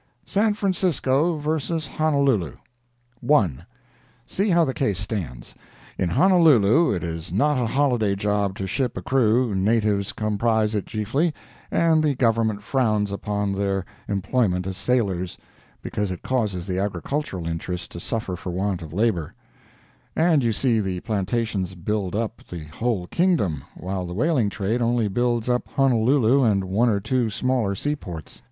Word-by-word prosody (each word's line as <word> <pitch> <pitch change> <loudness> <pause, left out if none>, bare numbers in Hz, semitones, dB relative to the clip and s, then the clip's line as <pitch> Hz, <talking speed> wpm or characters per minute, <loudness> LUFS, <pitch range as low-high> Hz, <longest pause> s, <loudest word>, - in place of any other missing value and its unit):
SAN 210 +1 +1
FRANCISCO 175 - +1
VS. 155 +1 -2
HONOLULU 140 - +1 0.6
1. 90 - +2 0.6
See 200 +3 -1
how 170 -2 +4
the 130 - -2
case 105 -10 0
stands: 90 - -4 0.4
In 90 - -1
Honolulu 160 - +5
it 90 -3 -2
is 85 -1 -5
not 140 +9 +2
a 120 - 0
holiday 120 -5 +1
job 100 -1 0
to 95 - -4
ship 125 +6 -1
a - - -5
crew, 120 -3 +2
natives 100 0 +1
comprise 110 0 0
it 105 -2 -2
chiefly, 135 +10 -1 0.3
and 160 -2 +3
the 145 -3 +2
Government 115 -4 +1
frowns 105 -5 +1
upon 100 0 -2
their 95 -1 -1 0.2
employment 100 -2 0
as 95 -1 -4
sailors, 95 -4 -1 0.5
because 105 -1 -2
it 90 - -6
causes 105 -9 -1
the 95 -1 -2
agricultural 100 - -3
interests 85 +2 -4
to 85 - -8
suffer 100 -1 -3
for 90 - -7
want 95 +1 -1
of 80 -2 -8
labor, 95 -6 0 0.8
and 160 -4 +3
you 115 - +2
see 115 +1 +1
the 95 -3 -2
plantations 100 -3 -2
build 100 +1 -2
up 115 +1 -3
the 85 -3 -6
whole 95 +4 -2
kingdom, 105 - +1
while 95 -1 -4
the 90 - -6
whaling 125 - +2
trade 105 +5 -1
only 120 -2 +2
builds 120 +2 0
up 125 0 0
Honolulu 130 0 +3
and 100 -5 +2
one 105 +6 +2
or 100 -3 +1
two 115 +3 0
smaller 115 -2 0
seaports. 95 - -5
110 Hz, 150 wpm, -23 LUFS, 95-130 Hz, 0.8 s, Honolulu